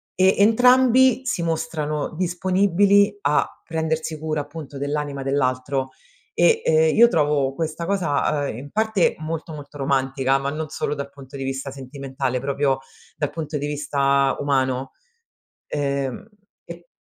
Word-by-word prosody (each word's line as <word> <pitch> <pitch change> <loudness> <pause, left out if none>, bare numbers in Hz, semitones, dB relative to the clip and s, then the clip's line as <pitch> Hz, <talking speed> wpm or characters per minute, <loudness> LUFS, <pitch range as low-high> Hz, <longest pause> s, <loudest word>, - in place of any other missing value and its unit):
e 190 +1 +4
entrambi 250 +4 +5
si 245 -9 -1
mostrano 155 -3 -2
disponibili 190 +3 +3
a 145 -3 +2 0.2
prendersi 160 -1 -2
cura 155 -1 -2
appunto 145 -1 -9
dell'anima 145 0 -3
dell'altro 135 0 -1 0.4
e, 455 -1 +3
ehm, 160 0 +3
io 235 +2 +8
trovo 145 - +1
questa 160 +2 -3
cosa, 150 -6 0
ehm, 110 - -5
in 140 +3 -9
parte 220 -4 +1
molto 160 +1 -5
molto 145 -1 -10
romantica, 135 -1 +1
ma 135 0 -2
non 155 +1 -4
solo 150 -1 -2
dal 140 -1 -5
punto 140 0 -12
di 135 - -4
vista 135 +1 -3
sentimentale, 135 -1 -4
proprio 135 0 0 0.4
dal 150 -2 -1
punto 155 -1 -4
di 145 - -3
vista 140 -2 +1
umano. 130 -2 0 0.8
Ehm, 140 - -2 0.4
e 170 0 -11
150 Hz, 140 wpm, -22 LUFS, 140-170 Hz, 0.8 s, io